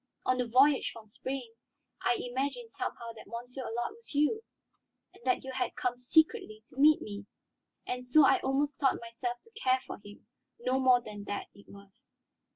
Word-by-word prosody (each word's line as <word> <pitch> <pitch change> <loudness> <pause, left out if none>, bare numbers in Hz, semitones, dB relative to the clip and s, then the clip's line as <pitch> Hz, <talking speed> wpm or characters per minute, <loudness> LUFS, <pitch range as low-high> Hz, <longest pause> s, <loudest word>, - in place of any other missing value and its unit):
On 255 0 +2
the 250 - +1
voyage 265 +4 +5
from 225 -2 -12
Spain, 255 +2 -5 0.5
I 240 - +3
imagined 280 - -3
somehow 235 -1 -4
that 225 - -13
Monsieur 245 +4 -6
Allard 240 - -3
was 460 -10 -12
you, 300 +10 +3 0.8
that 255 - +2
you 265 - -5
had 260 - -2
come 245 -1 -1
secretly 250 - +2
to - - -18
meet 300 +2 +6
me, 205 -1 -7 0.6
and 250 0 -3
so 275 +4 +6
I - - +5
almost 270 +1 0
taught 270 -3 +3
myself 240 +1 -4
to 460 - -22
care 260 - +1
for - - -7
him. 205 0 -13 0.3
No 255 +2 +1
more 255 -2 +5
than 210 -3 -8
that 205 - -4
it 200 - -17
was." 200 -1 -16
250 Hz, 175 wpm, -31 LUFS, 230-275 Hz, 0.8 s, meet